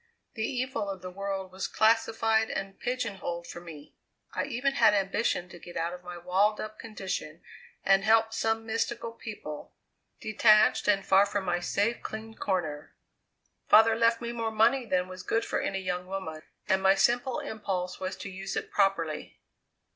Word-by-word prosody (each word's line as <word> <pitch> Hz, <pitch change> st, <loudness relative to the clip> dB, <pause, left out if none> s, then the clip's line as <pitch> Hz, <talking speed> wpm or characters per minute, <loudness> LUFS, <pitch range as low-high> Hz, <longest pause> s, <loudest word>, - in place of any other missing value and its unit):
The 220 Hz, -, -5 dB
evil 255 Hz, -3 st, -2 dB
of 190 Hz, -2 st, -6 dB
the 185 Hz, -, -6 dB
world 195 Hz, 0 st, -4 dB
was 190 Hz, +1 st, -3 dB
classified 225 Hz, 0 st, +2 dB
and 195 Hz, 0 st, -5 dB
pigeon 250 Hz, -5 st, -2 dB
holed 170 Hz, -2 st, -4 dB
for 170 Hz, -, -8 dB
me. 155 Hz, -4 st, -11 dB, 0.4 s
I -, -, -1 dB
even 275 Hz, +1 st, -1 dB
had 215 Hz, -6 st, +5 dB
ambition 195 Hz, -2 st, 0 dB
to 175 Hz, -, -11 dB
get 175 Hz, -, -9 dB
out 170 Hz, +1 st, -1 dB
of 180 Hz, 0 st, -9 dB
my 175 Hz, 0 st, -7 dB
walled 190 Hz, +5 st, +2 dB
up 215 Hz, 0 st, -6 dB
condition 190 Hz, -7 st, -5 dB, 0.4 s
and 195 Hz, 0 st, +5 dB
help 225 Hz, +1 st, +4 dB
some 225 Hz, 0 st, 0 dB
mystical 230 Hz, +1 st, -2 dB
people, 205 Hz, -10 st, -8 dB, 0.4 s
detached 215 Hz, 0 st, +4 dB
and 195 Hz, -2 st, +3 dB
far 195 Hz, +1 st, +5 dB
from 200 Hz, -1 st, -2 dB
my 175 Hz, -1 st, +1 dB
safe, 205 Hz, +6 st, 0 dB
clean 220 Hz, +1 st, -6 dB
corner. 160 Hz, -9 st, -3 dB, 0.7 s
Father 220 Hz, +1 st, +7 dB
left 230 Hz, 0 st, +3 dB
me 235 Hz, 0 st, -3 dB
more 230 Hz, -1 st, -2 dB
money 230 Hz, +3 st, +3 dB
than 180 Hz, -2 st, +1 dB
was 185 Hz, 0 st, -8 dB
good 225 Hz, +5 st, 0 dB
for -, -, -1 dB
any 195 Hz, 0 st, -2 dB
young 180 Hz, -1 st, -3 dB
woman, 185 Hz, -5 st, -5 dB, 0.3 s
and 190 Hz, -1 st, +2 dB
my 195 Hz, 0 st, +5 dB
simple 245 Hz, +6 st, +2 dB
impulse 185 Hz, -4 st, -4 dB
was 190 Hz, +1 st, -3 dB
to 200 Hz, -, -7 dB
use 190 Hz, +1 st, -5 dB
it -, -, -4 dB
properly." 180 Hz, -6 st, 0 dB
200 Hz, 175 wpm, -29 LUFS, 185-225 Hz, 0.7 s, Father